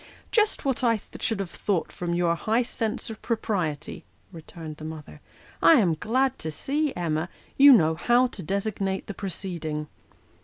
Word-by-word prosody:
" -, -, -26 dB
Just 425 Hz, -7 st, +2 dB
what 265 Hz, -1 st, 0 dB
I 230 Hz, -3 st, +3 dB, 0.2 s
should 225 Hz, -4 st, -1 dB
have 195 Hz, -3 st, -4 dB
thought 195 Hz, -5 st, -1 dB
from 170 Hz, -1 st, -3 dB
your 175 Hz, -1 st, +2 dB
high 220 Hz, +8 st, +1 dB
sense 225 Hz, 0 st, -3 dB
of 220 Hz, -, -10 dB
pro 230 Hz, -, 0 dB
priety," 170 Hz, -10 st, -3 dB, 0.3 s
returned 160 Hz, -1 st, -9 dB
the 155 Hz, -, -10 dB
mother. 155 Hz, -1 st, -8 dB, 0.2 s
" -, -, -25 dB
I -, -, +8 dB
am 200 Hz, -, +4 dB
glad 255 Hz, -, 0 dB
to 160 Hz, -, -4 dB
see, 290 Hz, -, -1 dB
Emma, 165 Hz, -1 st, -1 dB, 0.3 s
you 280 Hz, +1 st, +9 dB
know 160 Hz, -10 st, +6 dB
how 240 Hz, +9 st, +3 dB
to 240 Hz, -5 st, -5 dB
designate 195 Hz, +1 st, -2 dB
the 205 Hz, -, -6 dB
proceeding." 170 Hz, -6 st, -4 dB
195 Hz, 180 wpm, -26 LUFS, 165-240 Hz, 0.3 s, you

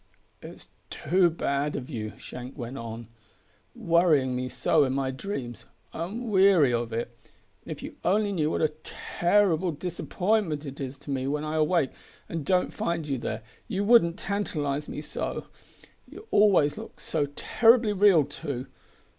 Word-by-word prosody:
"It's -, -, -12 dB, 0.2 s
too 180 Hz, +3 st, +2 dB
bad 145 Hz, -2 st, -1 dB
of 125 Hz, -, -5 dB
you," 110 Hz, -7 st, -5 dB
Shank 125 Hz, +3 st, -9 dB
went 120 Hz, 0 st, -6 dB
on, 115 Hz, 0 st, -7 dB, 0.7 s
"worrying 160 Hz, -7 st, +3 dB
me 130 Hz, 0 st, -2 dB
so 125 Hz, +3 st, +2 dB
in 130 Hz, -1 st, 0 dB
my 135 Hz, -1 st, -1 dB
dreams. 130 Hz, -, -6 dB, 0.3 s
I'm 215 Hz, +8 st, -4 dB
weary 190 Hz, -9 st, +5 dB
of 120 Hz, -1 st, -1 dB
it; 115 Hz, +1 st, -4 dB, 0.5 s
and -, -, -10 dB
if -, -, -6 dB
you -, -, -8 dB
only 205 Hz, +3 st, +2 dB
knew 155 Hz, -6 st, 0 dB
what -, -, -1 dB
a 155 Hz, -1 st, +1 dB
terrible 180 Hz, -1 st, +1 dB
disappointment 175 Hz, 0 st, -1 dB
it 140 Hz, 0 st, -8 dB
is 135 Hz, 0 st, -5 dB
to 145 Hz, +1 st, -8 dB
me 135 Hz, -1 st, -1 dB
when 150 Hz, +2 st, -1 dB
I 155 Hz, 0 st, -3 dB
awake 155 Hz, -2 st, +2 dB, 0.4 s
and 165 Hz, -2 st, -4 dB
don't 180 Hz, +4 st, +1 dB
find 165 Hz, -2 st, -2 dB
you 135 Hz, -3 st, -1 dB
there, 110 Hz, -1 st, -4 dB, 0.2 s
you 195 Hz, +1 st, -1 dB
wouldn't 200 Hz, -6 st, +5 dB
tantalise 150 Hz, -9 st, -2 dB
me -, -, -5 dB
so. -, -, -4 dB, 0.6 s
You 435 Hz, -, -12 dB
always 190 Hz, -8 st, +4 dB
look -, -, -10 dB
so 150 Hz, -3 st, -1 dB
terribly 230 Hz, -2 st, +4 dB
real 190 Hz, -7 st, +5 dB
too! 140 Hz, -3 st, -5 dB
155 Hz, 160 wpm, -27 LUFS, 135-185 Hz, 0.7 s, weary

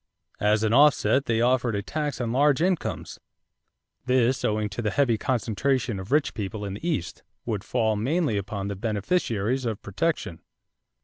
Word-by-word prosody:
As 105 Hz, +1 st, +2 dB
an 110 Hz, 0 st, +2 dB
offset 140 Hz, 0 st, +4 dB
they 115 Hz, -1 st, +1 dB
offered 120 Hz, -2 st, +2 dB
a 100 Hz, -, -2 dB
tax 145 Hz, 0 st, -3 dB
on 120 Hz, -2 st, -2 dB
large 140 Hz, +2 st, +3 dB
incomes; 180 Hz, 0 st, -1 dB, 0.9 s
this 125 Hz, 0 st, +2 dB
owing 105 Hz, 0 st, 0 dB
to 120 Hz, -, -5 dB
the 110 Hz, -, 0 dB
heavy 125 Hz, -1 st, +2 dB
concentration 120 Hz, 0 st, -1 dB
of 95 Hz, +4 st, -8 dB
rich 150 Hz, 0 st, +2 dB
people 105 Hz, 0 st, -4 dB
in 100 Hz, -, -4 dB
the 110 Hz, -, -6 dB
East, 90 Hz, -, -3 dB, 0.2 s
would -, -, -2 dB
fall 110 Hz, -1 st, 0 dB
mainly 135 Hz, +4 st, 0 dB
upon 100 Hz, 0 st, -3 dB
the 100 Hz, -, -3 dB
beneficiaries 110 Hz, -, -1 dB
of 115 Hz, -4 st, -2 dB
protection. 105 Hz, -, -2 dB
115 Hz, 165 wpm, -25 LUFS, 105-135 Hz, 0.9 s, offset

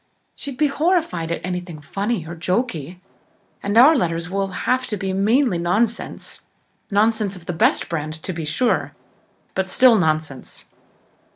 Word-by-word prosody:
She'd 275 Hz, -3 st, -6 dB
be 305 Hz, -, +3 dB
horrified 295 Hz, -, 0 dB
at 170 Hz, -, -3 dB
anything 180 Hz, -3 st, -5 dB
funny 195 Hz, +4 st, -3 dB
or 170 Hz, +2 st, -7 dB
jokey 180 Hz, -, -2 dB, 0.6 s
and 205 Hz, +2 st, -1 dB
our 280 Hz, +7 st, +8 dB
letters 170 Hz, -, -1 dB
will 195 Hz, 0 st, 0 dB
have 255 Hz, +7 st, -1 dB
to 210 Hz, -, -3 dB
be 190 Hz, 0 st, -3 dB
mainly 210 Hz, +1 st, +2 dB
nonsense 210 Hz, +7 st, -1 dB, 0.5 s
nonsense 210 Hz, -1 st, +1 dB
of 175 Hz, -2 st, -13 dB
the 175 Hz, -, -3 dB
best 165 Hz, -, +2 dB
brand, 155 Hz, -2 st, -3 dB
to 185 Hz, -, -3 dB
be 165 Hz, -1 st, -5 dB
sure, 155 Hz, +11 st, 0 dB, 0.6 s
but 190 Hz, 0 st, -1 dB
still 250 Hz, +3 st, +6 dB
nonsense." 155 Hz, -7 st, -2 dB
190 Hz, 150 wpm, -21 LUFS, 170-235 Hz, 0.6 s, our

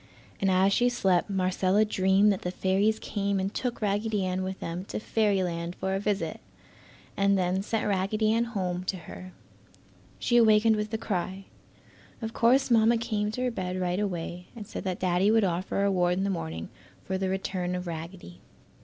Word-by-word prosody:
And 195 Hz, -, +2 dB
as 190 Hz, +1 st, +4 dB
she 245 Hz, +3 st, +3 dB
slept 195 Hz, -7 st, +1 dB
Marcella 190 Hz, +2 st, +2 dB
dreamed 195 Hz, 0 st, +3 dB
that 190 Hz, -, -5 dB
the 180 Hz, -, -2 dB
fairies 195 Hz, +4 st, +1 dB
came 200 Hz, -2 st, -2 dB
and 195 Hz, +2 st, -2 dB
took 245 Hz, -3 st, -3 dB
Raggedy 205 Hz, 0 st, 0 dB
Ann 185 Hz, 0 st, -1 dB
with 190 Hz, 0 st, -4 dB
them 170 Hz, +2 st, -4 dB
to -, -, -5 dB
fairyland 185 Hz, -6 st, 0 dB
for 190 Hz, 0 st, -2 dB
a 195 Hz, -, 0 dB
visit, 205 Hz, 0 st, -2 dB, 0.8 s
and 200 Hz, 0 st, +3 dB
then 185 Hz, +1 st, +1 dB
sent 220 Hz, +2 st, -2 dB
Raggedy 210 Hz, +2 st, +1 dB
Ann 230 Hz, +1 st, +2 dB
home 185 Hz, -6 st, -3 dB
to 190 Hz, -, -2 dB
her. 185 Hz, +2 st, -10 dB, 0.9 s
She 240 Hz, -, +2 dB
awakened 220 Hz, -1 st, +5 dB
with 210 Hz, 0 st, -3 dB
a 220 Hz, -, -1 dB
cry. 190 Hz, -2 st, -3 dB, 0.7 s
Of 225 Hz, -1 st, -5 dB
course 250 Hz, +3 st, +3 dB
Mamma 230 Hz, 0 st, +5 dB
came 215 Hz, -3 st, -1 dB
to 250 Hz, -, -2 dB
her 250 Hz, -, 0 dB
bed 185 Hz, -4 st, -3 dB
right 180 Hz, +1 st, -1 dB
away 180 Hz, -3 st, -4 dB
and 220 Hz, -3 st, -7 dB
said -, -, -7 dB
that 185 Hz, -2 st, -2 dB
Daddy 185 Hz, +2 st, +2 dB
would 220 Hz, 0 st, +4 dB
offer 180 Hz, 0 st, -1 dB
a -, -, +2 dB
reward 180 Hz, -3 st, +2 dB
in 190 Hz, -, 0 dB
the 200 Hz, -, 0 dB
morning 80 Hz, -, -4 dB, 0.4 s
for 190 Hz, 0 st, -2 dB
the 190 Hz, -1 st, -1 dB
return 185 Hz, -1 st, -2 dB
of 180 Hz, 0 st, -4 dB
Raggedy. 165 Hz, -, -8 dB
195 Hz, 190 wpm, -28 LUFS, 185-215 Hz, 0.9 s, awakened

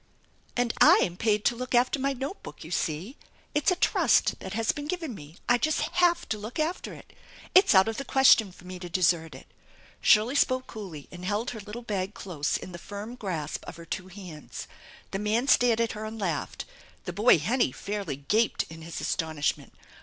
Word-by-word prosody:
"And 245 Hz, -1 st, +1 dB
7 -, -, +8 dB
am 175 Hz, -, -6 dB
paid 210 Hz, +1 st, +1 dB
to 240 Hz, -, +3 dB
look 255 Hz, +1 st, -3 dB
after 250 Hz, +3 st, +3 dB
my 275 Hz, +1 st, +1 dB
note 270 Hz, +9 st, -5 dB
book, -, -, -10 dB
you 160 Hz, -, -10 dB
see. 175 Hz, -, -2 dB, 0.4 s
It's 295 Hz, +3 st, +2 dB
a 365 Hz, -, +3 dB
trust -, -, +3 dB
that -, -, -7 dB
has 225 Hz, 0 st, +1 dB
been 290 Hz, 0 st, -6 dB
given 330 Hz, -6 st, -3 dB
me! 150 Hz, -4 st, -11 dB
I 240 Hz, 0 st, +4 dB
just 310 Hz, +3 st, +1 dB
have 345 Hz, -1 st, +2 dB
to 215 Hz, -, -2 dB
look 215 Hz, +4 st, -7 dB
after 320 Hz, +3 st, -2 dB
it. -, -, -15 dB, 0.4 s
It's 375 Hz, -, +6 dB
out 190 Hz, +2 st, +7 dB
of 225 Hz, 0 st, -2 dB
the 275 Hz, -, -3 dB
question 260 Hz, -7 st, +5 dB
for 180 Hz, -, -17 dB
me 185 Hz, 0 st, -7 dB
to 180 Hz, -1 st, -7 dB
desert 165 Hz, -4 st, +1 dB
it! 130 Hz, -, -12 dB, 0.3 s
" -, -, -27 dB
Shirley 220 Hz, +5 st, +5 dB
spoke 255 Hz, -2 st, +2 dB
coolly 185 Hz, -10 st, -8 dB
and 180 Hz, 0 st, -10 dB
held 210 Hz, +7 st, -1 dB
her 230 Hz, -, -7 dB
little 210 Hz, +4 st, -8 dB
bag 200 Hz, -3 st, -3 dB
close 155 Hz, -6 st, -2 dB
in 185 Hz, -, -9 dB
the 175 Hz, -, -8 dB
firm 205 Hz, +5 st, -7 dB
grasp 175 Hz, -11 st, -4 dB
of -, -, -8 dB
her 170 Hz, -, -11 dB
two 185 Hz, +2 st, -5 dB
hands. 180 Hz, -5 st, -9 dB, 0.4 s
The 195 Hz, -, -2 dB
man 220 Hz, +5 st, 0 dB
stared 240 Hz, -4 st, +4 dB
at 230 Hz, -1 st, +1 dB
her 215 Hz, 0 st, -6 dB
and 220 Hz, +1 st, -6 dB
laughed. 170 Hz, -7 st, -3 dB, 0.4 s
The 180 Hz, -, -4 dB
boy 210 Hz, +2 st, +5 dB
Hennie 220 Hz, -, +1 dB
fairly 200 Hz, -1 st, -4 dB
gaped 210 Hz, -, +1 dB
in 160 Hz, 0 st, -10 dB
his 165 Hz, 0 st, -6 dB
astonishment. 155 Hz, -3 st, -1 dB
210 Hz, 210 wpm, -27 LUFS, 175-245 Hz, 0.4 s, 7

